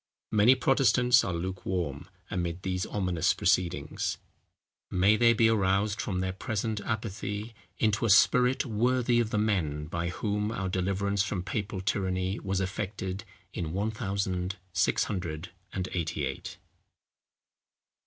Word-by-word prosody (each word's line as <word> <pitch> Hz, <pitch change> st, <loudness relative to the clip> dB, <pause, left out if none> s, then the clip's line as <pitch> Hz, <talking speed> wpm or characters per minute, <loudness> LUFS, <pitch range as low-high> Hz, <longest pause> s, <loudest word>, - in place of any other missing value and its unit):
Many 110 Hz, +4 st, +6 dB
Protestants 125 Hz, -2 st, +4 dB
are 90 Hz, -, -2 dB
lukewarm 90 Hz, 0 st, -3 dB, 0.2 s
amid 85 Hz, 0 st, -2 dB
these 95 Hz, -1 st, -1 dB
ominous 90 Hz, -4 st, +1 dB
proceedings. 90 Hz, -2 st, 0 dB, 0.7 s
May 95 Hz, +4 st, +4 dB
they 115 Hz, +1 st, +5 dB
be 115 Hz, -1 st, +4 dB
aroused 105 Hz, -1 st, +2 dB
from 95 Hz, -3 st, -2 dB
their 95 Hz, 0 st, -1 dB
present 110 Hz, +2 st, -2 dB
apathy 110 Hz, 0 st, -4 dB, 0.2 s
into 110 Hz, +2 st, +1 dB
a -, -, +1 dB
spirit 125 Hz, +6 st, +5 dB
worthy 120 Hz, +1 st, +2 dB
of 115 Hz, -2 st, +1 dB
the 105 Hz, -, -1 dB
men, 85 Hz, -9 st, 0 dB
by 85 Hz, +2 st, -3 dB
whom 105 Hz, +3 st, -1 dB
our 100 Hz, -4 st, -2 dB
deliverance 100 Hz, +2 st, 0 dB
from 100 Hz, -3 st, -2 dB
papal 100 Hz, -1 st, -3 dB
tyranny 95 Hz, 0 st, -1 dB
was 95 Hz, -1 st, -1 dB
effected 95 Hz, 0 st, -3 dB, 0.3 s
in 80 Hz, -2 st, -3 dB
ONE 105 Hz, +4 st, 0 dB
THOUSAND 95 Hz, -4 st, -2 dB, 0.2 s
SIX 95 Hz, -, +2 dB
HUNDRED 85 Hz, -3 st, -4 dB, 0.2 s
AND 95 Hz, -1 st, -3 dB
EIGHTY 85 Hz, -4 st, -1 dB
EIGHT. -, -, -6 dB
100 Hz, 135 wpm, -29 LUFS, 90-110 Hz, 0.7 s, Many